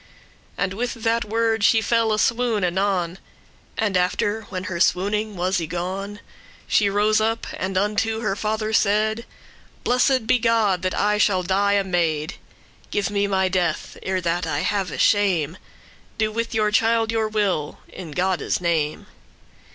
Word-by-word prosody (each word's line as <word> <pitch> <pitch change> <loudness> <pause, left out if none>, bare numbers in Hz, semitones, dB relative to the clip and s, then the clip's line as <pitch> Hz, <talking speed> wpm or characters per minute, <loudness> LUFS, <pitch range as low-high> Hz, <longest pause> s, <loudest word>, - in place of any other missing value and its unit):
And 195 -1 -1
with 240 +4 -3
that 230 +1 0
word 225 0 0
she 225 - +5
fell 225 +1 +1
a 215 - +1
swoon 230 -2 +1
anon; 180 -1 0 0.6
And 210 -3 0
after, 205 +4 0
when 185 -1 -4
her 185 -2 -4
swooning 205 +4 +1
was 185 +1 0
y 165 - -3
gone, 190 +4 -4 0.4
She 205 -2 +2
rose 210 +2 +2
up, 225 +1 0
and 185 0 -3
unto 215 +3 0
her 205 -4 -1
father 215 +1 -2
said: 215 +3 +1 0.6
"Blessed 255 0 +2
be 245 - +3
God, 225 -5 +2
that 185 0 -1
I 210 0 +1
shall 190 -3 +2
die 200 +3 +1
a 200 -1 +2
maid. 165 -5 -1 0.5
Give 205 0 -1
me 200 0 +1
my 190 -1 +1
death, 185 -2 -1
ere 190 -1 -1
that 170 0 -1
I 145 -2 -1
have 195 -5 -2
shame; 185 -6 +2 0.6
Do 215 -1 0
with 230 +1 -3
your 210 -1 +2
child 225 0 +2
your 225 -1 0
will, 200 -8 -1
in 180 -4 -9
Godde's 180 +4 -1
name." 160 -4 -1
205 Hz, 160 wpm, -22 LUFS, 185-220 Hz, 0.6 s, she